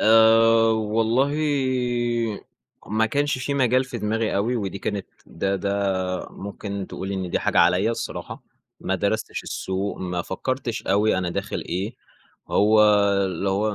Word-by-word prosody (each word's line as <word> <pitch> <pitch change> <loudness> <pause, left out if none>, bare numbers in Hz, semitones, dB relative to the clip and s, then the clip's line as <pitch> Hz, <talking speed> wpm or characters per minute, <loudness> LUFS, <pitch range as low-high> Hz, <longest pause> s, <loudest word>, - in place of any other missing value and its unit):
آآ، 115 0 +6
والله 115 +5 +1 1.5
ما 110 +2 +1
كانش 140 +3 0
في 140 +2 -2
مجال 130 -1 +3
في 125 -1 -6
دماغي 110 +1 -1
أوي، 115 +5 0
ودي 100 -3 -3
كانت 100 -1 -3 0.2
ده 100 0 -2
ده 95 -2 -1
ممكن 100 0 -6
تقولي 95 +1 -5
إن 95 -2 -3
دي - - +1
حاجة - - 0
عليَّ 90 +5 +4
الصراحة، 115 - -5 0.4
ما - - -1
درستش - - -2
السوق، 95 +2 -3
ما 90 -1 -3
فكّرتش 125 +5 -3
أوي 105 0 +2
أنا 90 -1 -1
داخل - - -3
إيه، 95 +5 -3 0.5
هو 105 +1 +4 0.4
اللي 95 +1 -2
هو 105 +2 0
105 Hz, 140 wpm, -23 LUFS, 95-115 Hz, 1.5 s, آآ